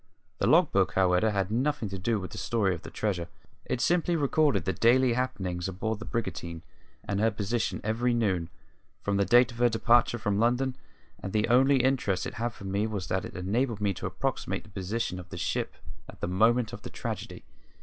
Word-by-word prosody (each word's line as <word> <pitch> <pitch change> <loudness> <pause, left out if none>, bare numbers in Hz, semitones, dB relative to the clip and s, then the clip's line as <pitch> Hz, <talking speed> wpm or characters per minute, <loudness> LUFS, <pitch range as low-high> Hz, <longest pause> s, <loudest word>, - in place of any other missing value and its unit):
The - - +1
log 165 0 +5
book, 95 -1 +2
however, 95 +2 +3
had 100 -2 -1
nothing 130 0 0
to 95 0 -5
do 110 +3 0
with 95 - -7
the - - -6
story 105 -5 +1
of 85 - -6
the - - -9
treasure; 90 -6 -2 0.4
it 130 - -2
simply 175 0 +2
recorded 145 - +2
the 95 - 0
daily 125 +1 +4
happenings 95 -8 -2
aboard 105 +3 -3
the 100 - -7
brigantine 85 -8 -4 0.4
and 100 0 -2
her 110 +2 +4
position 110 +2 -2
every 115 +3 +1
noon, 95 -8 0 0.5
from 100 -1 0
the 100 - +2
date 120 +3 +5
of 120 - -11
her 120 0 +5
departure 120 +1 +3
from 105 -3 -1
London; 125 +3 +1 0.5
and 95 - -5
the 105 0 +2
only 130 +2 +5
interest 125 -8 +1
it - - -5
had 120 - +1
for 110 - -13
me 100 +2 -1
was 100 -4 -4
that 95 - -1
it - - -9
enabled 110 +5 -1
me 100 -1 +1
to - - -5
approximate - - -3
the 105 - -17
position 95 0 -3
of 90 0 -11
the 90 - -7
ship 85 - -2 0.3
at - - -12
the - - -2
moment 110 +6 +2
of - - -7
the - - -7
tragedy. - - -6
110 Hz, 210 wpm, -28 LUFS, 95-120 Hz, 0.5 s, log